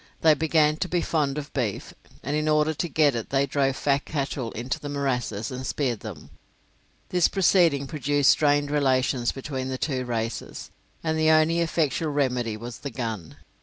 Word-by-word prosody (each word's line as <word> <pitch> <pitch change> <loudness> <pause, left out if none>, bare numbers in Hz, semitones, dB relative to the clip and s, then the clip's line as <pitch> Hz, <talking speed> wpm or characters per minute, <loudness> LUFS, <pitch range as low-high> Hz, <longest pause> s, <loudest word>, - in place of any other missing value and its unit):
They 160 -1 +6
began 155 0 +2
to 185 - -2
be 175 0 0
fond 150 -4 0
of 150 0 -6
beef, 120 -8 -3 0.3
and 140 +4 -2
in 155 0 0
order 150 +1 +3
to 170 +3 -3
get 150 -1 +3
it 115 -2 -4
they 135 0 +2
drove 135 -1 0
fat 140 0 +1
cattle 135 -5 -3
into 120 +3 -3
the 145 - -6
morasses 125 -6 -2
and 130 +1 -5
speared 130 -5 -1
them. - - -9 0.8
This 180 -2 +3
proceeding 170 -7 +3
produced 145 -1 +2
strained 145 -1 +2
relations 130 -3 +1
between 135 -1 -5
the 130 0 -3
two 130 -2 -2
races, 115 -2 -4 0.3
and 160 -1 0
the 155 0 +3
only 160 +2 +4
effectual 160 -2 0
remedy 125 -6 0
was 120 +1 -8
the 140 - -5
gun. 110 -9 -5
140 Hz, 175 wpm, -25 LUFS, 130-155 Hz, 0.8 s, They